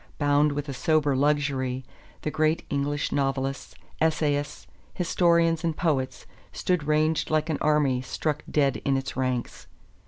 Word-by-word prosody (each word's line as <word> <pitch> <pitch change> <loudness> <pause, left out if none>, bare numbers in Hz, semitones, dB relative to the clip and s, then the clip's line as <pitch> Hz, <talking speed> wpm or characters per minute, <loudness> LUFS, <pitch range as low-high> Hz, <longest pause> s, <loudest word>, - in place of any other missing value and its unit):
Bound 145 0 +3
with 145 +1 -4
a 140 - -4
sober 145 +1 +2
luxury, 135 -2 0 0.4
the 155 - -1
great 155 +1 +1
English 145 +1 -1
novelists, 135 -1 -2 0.3
essayists, 150 -2 0 0.3
historians 170 -2 +2
and 165 -2 -1
poets 130 -6 -1 0.3
stood 180 -5 -1
ranged 155 +1 +1
like 155 +1 +1
an 150 - -2
army 145 -4 +2
struck 150 +3 -2
dead 140 -3 +2
in 135 -1 +2
its 135 - -4
ranks. 130 -2 -3
145 Hz, 135 wpm, -26 LUFS, 135-155 Hz, 0.4 s, Bound